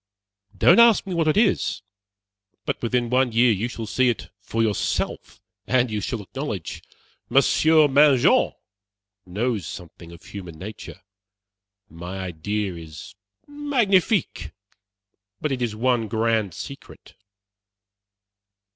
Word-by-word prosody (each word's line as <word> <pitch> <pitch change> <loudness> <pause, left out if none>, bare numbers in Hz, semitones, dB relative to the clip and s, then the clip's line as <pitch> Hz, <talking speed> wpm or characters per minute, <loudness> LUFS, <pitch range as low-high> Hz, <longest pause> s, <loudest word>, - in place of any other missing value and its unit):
Don't 225 - +6
ask 235 -3 +6
me 190 - -5
what 165 -2 0
it 155 - +2
is, 215 - +1 0.8
but - - -3
within 120 0 -1
one 130 -1 +2
year 120 +1 +4
you 110 +3 -1
shall 115 -2 -6
see 130 +3 +2
it 120 - -4
for 115 +2 -2
yourself, 105 -3 -2 0.3
and 125 -2 +2
you 105 -1 -2
shall 110 +1 -4
acknowledge 105 - -6 0.5
Monsieur 155 -1 +4
Mangin 140 -2 +4 0.7
knows 105 -1 -2
something 85 -1 -10
of 85 - -14
human 90 -5 -9
nature. 95 +1 -9 0.9
My 85 +4 -8
idea 95 +3 -3
is 85 +3 -10 0.3
magnifique, 240 - 0 0.9
but 150 - -2
it 130 -2 -2
is 115 -3 -2
one 120 0 +1
grand 110 -4 0
secret." 140 -1 -10
115 Hz, 120 wpm, -23 LUFS, 100-140 Hz, 0.9 s, Don't